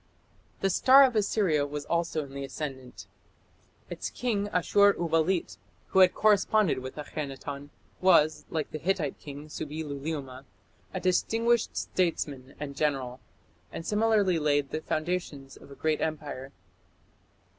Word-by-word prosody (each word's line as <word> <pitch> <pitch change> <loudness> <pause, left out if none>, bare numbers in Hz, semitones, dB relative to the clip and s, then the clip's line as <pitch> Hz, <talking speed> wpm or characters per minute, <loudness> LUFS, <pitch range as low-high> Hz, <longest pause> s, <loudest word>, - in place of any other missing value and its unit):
The 195 - +2
star 265 +8 +7
of 255 -3 +3
Assyria 195 -8 +2
was 145 0 -5
also 170 -2 -1
in 135 - -13
the 140 0 -5
ascendant. 135 -3 -7 0.8
Its - - -5
king, 210 -5 -1
Ashur 200 +2 +4
uballit, 165 - 0 0.3
who 190 - +3
had 185 -1 +6
corresponded 210 -5 +3
with 130 0 -7
Akhenaton, 145 -1 -6 0.3
was, 165 -4 +4
like 155 -3 -3
the 155 - -5
Hittite 170 -4 -1
king, 145 +1 -9
Subbi 155 +1 -5
luliuma, 140 -2 -5 0.5
a 185 - -3
distinguished 225 +6 +1
statesman 145 -7 -2
and 140 -1 -5
general, 135 -4 -1 0.5
and 165 - -7
similarly 210 -5 +2
laid 145 -2 +1
the 155 - -3
foundations 155 -5 -3
of - - -15
a 140 - -11
great 155 +2 0
empire. 145 -4 -4
155 Hz, 135 wpm, -28 LUFS, 140-190 Hz, 0.8 s, star